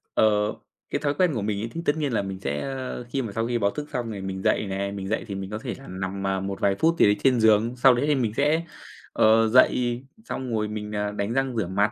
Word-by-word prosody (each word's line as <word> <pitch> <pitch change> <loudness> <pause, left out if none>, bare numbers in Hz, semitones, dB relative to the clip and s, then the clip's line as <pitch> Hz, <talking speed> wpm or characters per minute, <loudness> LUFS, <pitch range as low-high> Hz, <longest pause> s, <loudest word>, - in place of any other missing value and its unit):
Ờ, - - +5 0.6
cái - - -1
thói 145 -1 +1
quen 175 +1 +2
của 115 - -2
mình 100 0 -1
ấy 115 - -4
thì 165 - -5
tất 145 - +2
nhiên 145 -5 -1
là 110 - +2
mình 95 -1 -5
sẽ, 70 -3 -2
a, 135 -1 -4
khi 135 +2 -1
mà 115 -5 -5
sau 115 +2 -1
khi 120 0 0
báo 100 -3 +1
thức 150 +4 -6
xong 120 -3 -2
thì 100 -2 -6
mình 95 0 -4
dậy - - +2
nè, 100 +1 -2
mình 100 -1 -5
dậy 110 +3 -1
thì 100 - -5
mình 95 0 -5
có 105 - -4
thể 120 +1 -5
là 135 - -13
nằm, 95 +1 -4
à, 95 0 0
một 95 +1 -4
vài 100 -1 +2
phút 165 +1 +3
gì - - +7
đấy 105 - +4
trên 130 -3 +4
giường. 110 +2 +4
Sau 125 +1 +6
đấy 125 +4 0
thì 150 - +3
mình 120 -6 0
sẽ, 150 +4 +2 0.5
ờ, 110 +1 +5
dậy 120 0 +3 0.2
xong 130 -2 -4
rồi 105 -1 0
mình, 105 0 -5
à, 105 0 -1
đánh 105 +2 -2
răng 135 -2 0
rửa 105 - 0
mặt. 100 +3 +1
110 Hz, 280 wpm, -25 LUFS, 100-130 Hz, 0.6 s, gì